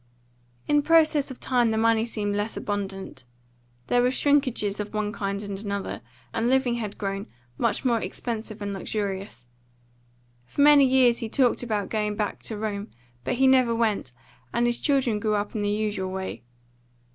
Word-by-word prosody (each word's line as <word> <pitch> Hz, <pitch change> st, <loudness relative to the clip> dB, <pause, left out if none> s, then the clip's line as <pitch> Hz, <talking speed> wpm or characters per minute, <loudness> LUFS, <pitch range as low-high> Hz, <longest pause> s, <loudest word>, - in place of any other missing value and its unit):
In 295 Hz, 0 st, +4 dB
process 310 Hz, -2 st, +4 dB
of 260 Hz, -, -9 dB
time 245 Hz, -3 st, +2 dB
the 220 Hz, -, 0 dB
money 225 Hz, 0 st, +3 dB
seemed 205 Hz, -3 st, -2 dB
less 205 Hz, +2 st, -2 dB
abundant. 195 Hz, -, -4 dB, 0.6 s
There 245 Hz, -, +2 dB
were 250 Hz, -, +3 dB
shrinkages 255 Hz, -7 st, +1 dB
of 210 Hz, +1 st, -5 dB
one 210 Hz, -1 st, -1 dB
kind 200 Hz, -1 st, -3 dB
and 200 Hz, -1 st, -5 dB
another, 200 Hz, -1 st, -4 dB, 0.3 s
and 230 Hz, +1 st, 0 dB
living 260 Hz, -2 st, +2 dB
had 220 Hz, -4 st, -4 dB
grown 195 Hz, -1 st, -3 dB, 0.3 s
much -, -, 0 dB
more 235 Hz, -2 st, +3 dB
expensive 220 Hz, -3 st, -4 dB
and 200 Hz, 0 st, -3 dB
luxurious. 195 Hz, -, -4 dB, 1.0 s
For 285 Hz, -, -2 dB
many 290 Hz, -1 st, +7 dB
years 255 Hz, -2 st, +4 dB
he 225 Hz, -, -4 dB
talked 250 Hz, 0 st, +2 dB
about 215 Hz, -4 st, -2 dB
going 210 Hz, -1 st, -1 dB
back 210 Hz, -1 st, -2 dB
to 220 Hz, -, -3 dB
Rome, 210 Hz, 0 st, -3 dB, 0.3 s
but -, -, -1 dB
he 265 Hz, +2 st, +3 dB
never 255 Hz, -3 st, +4 dB
went, 215 Hz, -, 0 dB, 0.4 s
and 240 Hz, -, +1 dB
his 240 Hz, 0 st, +2 dB
children 260 Hz, -7 st, +2 dB
grew 215 Hz, 0 st, 0 dB
up 205 Hz, 0 st, -2 dB
in 215 Hz, -, -2 dB
the 205 Hz, -, 0 dB
usual 205 Hz, -3 st, -1 dB
way. 190 Hz, 0 st, -5 dB
220 Hz, 170 wpm, -26 LUFS, 205-245 Hz, 1.0 s, many